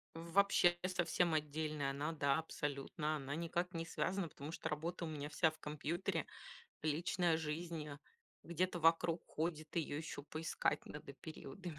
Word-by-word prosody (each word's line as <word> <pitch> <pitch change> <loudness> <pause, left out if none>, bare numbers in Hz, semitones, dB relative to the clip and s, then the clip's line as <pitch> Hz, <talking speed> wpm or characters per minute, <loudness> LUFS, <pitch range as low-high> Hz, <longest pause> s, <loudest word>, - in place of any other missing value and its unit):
Вообще 175 +1 +4
совсем 175 -2 +2
отдельная 150 -1 0
она, 145 +3 -1
да, 140 -2 +3
абсолютно, 150 0 -2
она 140 +1 -3
никак 170 +2 -1
не 165 -1 -2
связана, 180 +1 0
потому 145 +1 -7
что 160 - -3
работа 165 +3 -2
у - - -3
меня 150 -2 -3
вся 160 +2 +4
в 155 - -15
компьютере, 165 +4 -1 0.6
личная 165 +2 +2
жизнь, 160 0 -3
а, 145 - -7 0.4
где-то 175 +2 0
вокруг 165 +1 +4
ходит, 155 0 -2
её 155 -3 0
ещё 155 -2 -4
поискать 155 +2 0
надо 150 -1 -7
периодами, 160 +3 -7
160 Hz, 150 wpm, -39 LUFS, 150-170 Hz, 0.6 s, Вообще